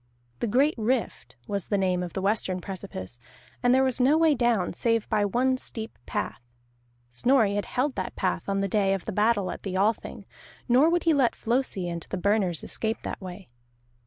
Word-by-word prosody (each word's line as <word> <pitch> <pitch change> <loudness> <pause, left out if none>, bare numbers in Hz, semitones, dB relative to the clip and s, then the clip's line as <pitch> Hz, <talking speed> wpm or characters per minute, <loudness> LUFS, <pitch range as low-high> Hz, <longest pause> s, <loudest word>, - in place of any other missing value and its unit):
The - - -1
Great 275 +8 +3
Rift 230 - -2
was 200 -2 -3
the 205 - +1
name 185 -2 +1
of 175 -2 -5
the 190 - -3
western 195 -2 0
precipice, 120 - -7 0.4
and 245 - +3
there 260 +1 +5
was 260 -1 +1
no 280 +5 +5
way 320 -1 +4
down 235 -8 +1
save 230 +3 0
by 210 - +2
one 255 +5 +1
steep 225 -3 -6
path; - - -3 0.7
Snorri 225 - +3
had 205 0 -1
held 260 +3 -1
that 185 -5 -4
path 185 0 -1
on 195 0 0
the 195 - 0
day 195 -1 +2
of 195 - -7
the - - -3
battle 210 -1 +2
at - - -7
the 190 -2 -3
Althing, 210 +4 -1 0.4
nor 260 +6 +5
would 345 +1 +1
he 330 - +4
let 270 -5 +2
Flosi 230 -6 -1
and 170 -1 -4
the - - -3
Burners 190 -3 +1
escape 220 0 -2
that - - -5
way. 185 +1 -8
210 Hz, 195 wpm, -26 LUFS, 190-250 Hz, 0.7 s, there